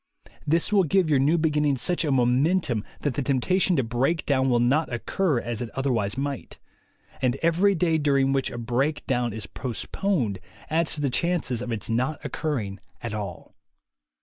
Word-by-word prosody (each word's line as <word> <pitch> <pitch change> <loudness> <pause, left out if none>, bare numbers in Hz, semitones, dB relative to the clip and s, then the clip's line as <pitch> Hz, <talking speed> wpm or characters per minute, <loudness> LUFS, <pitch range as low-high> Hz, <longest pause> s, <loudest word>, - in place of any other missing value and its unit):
This 165 +7 +2
will 200 -2 +5
give 175 0 +2
your 140 - +4
new 150 +6 +3
beginning 150 -3 +1
such 175 +8 0
a 150 - 0
momentum 130 - +2 0.2
that 145 - 0
the 140 - -2
temptation 175 +8 +1
to 135 - +2
break 125 +8 0
down 135 -2 +2
will 120 -1 +3
not 135 +7 +2
occur 145 +4 0
as 115 -1 -4
it 120 - -4
other 135 0 0
wise 105 -1 -1
might; 140 -2 -4 0.6
and 130 -1 +2
every 180 +5 +3
day 165 -2 +2
during 140 -2 +2
which 135 -1 0
a - - -7
break 125 +6 -1
down 120 -2 0
is 110 -1 -6
postponed 125 - -2 0.3
adds 160 0 +1
to 150 - -4
the 140 -3 0
chances 165 -6 0
of 125 -1 -4
its 105 -3 -3
not 130 +7 0
occurring 115 -11 -3 0.2
at 120 -3 -3
all." 100 -5 -6
135 Hz, 180 wpm, -25 LUFS, 120-160 Hz, 0.6 s, will